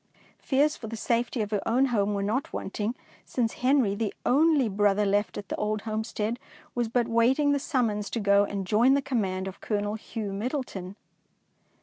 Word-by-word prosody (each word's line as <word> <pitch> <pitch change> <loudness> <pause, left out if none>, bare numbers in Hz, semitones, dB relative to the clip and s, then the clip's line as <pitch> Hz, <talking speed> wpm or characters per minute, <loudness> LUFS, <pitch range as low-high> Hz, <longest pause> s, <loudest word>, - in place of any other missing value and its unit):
Fears 295 +3 +2
for 225 - -8
the 230 - -5
safety 235 +1 0
of 210 - -6
her 205 -2 0
own 250 +4 +3
home 205 -1 +1
were 200 - -1
not 225 +7 -1
wanting, 210 +4 -3 0.3
since 230 -3 -1
Henry, 255 -5 +3
the 210 0 -2
only 290 -1 +4
brother 205 0 +2
left 205 +1 0
at 200 - -6
the - - -2
old 210 0 -1
homestead, 220 +1 -2 0.3
was 240 -1 0
but 235 +1 +1
waiting 250 +5 +3
the 285 - +2
summons 230 -9 -1
to 235 - -2
go 200 -1 +4
and 200 -1 -3
join 235 +7 +4
the 280 - +2
command 195 -8 -1
of 190 - -8
Colonel 205 -1 -1
Hugh 220 -2 -5
Middleton. 205 -4 -4
220 Hz, 185 wpm, -27 LUFS, 205-250 Hz, 0.3 s, only